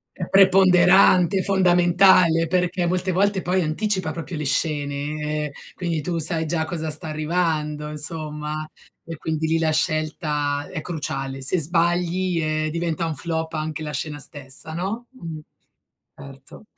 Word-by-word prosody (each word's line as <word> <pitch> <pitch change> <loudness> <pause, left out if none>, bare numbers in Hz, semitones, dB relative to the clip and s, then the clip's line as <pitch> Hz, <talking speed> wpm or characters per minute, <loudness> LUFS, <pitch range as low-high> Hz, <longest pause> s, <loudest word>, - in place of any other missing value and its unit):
È 175 - -5
preponderante, 185 -1 +5
è - - +1
fondamentale, 175 -2 +4
perché 180 0 0
molte 185 +1 -1
volte 195 +1 +1
poi 185 +2 +1
anticipa 185 +2 -1
proprio 165 +2 -6
le 150 -1 -4
scene, 150 +1 -2
ehm, 145 - -6 0.2
quindi 170 -3 -2
tu 170 +3 -3
sai 160 0 0
già 160 0 -1
cosa 160 -2 -3
sta 155 +1 +1
arrivando 155 -1 -2
insomma, 150 0 -2 0.4
e 165 -1 -7
quindi 160 0 -3
lì 165 +1 +1
la 160 -1 +1
scelta 150 -2 -1
è 170 -4 -4
cruciale. 135 -5 -5
Se 175 +6 +4
sbagli, 175 +2 +1
ehm, 155 0 -1
diventa 170 0 -2
un 160 - -2
flop 160 +2 -3
anche 155 0 -4
la 150 - -5
scena 150 +1 -4
stessa, 140 +2 -3
no? 195 +8 -4
Mh, 165 -11 -8 0.8
certo. 135 +3 -13
160 Hz, 145 wpm, -22 LUFS, 150-180 Hz, 0.8 s, preponderante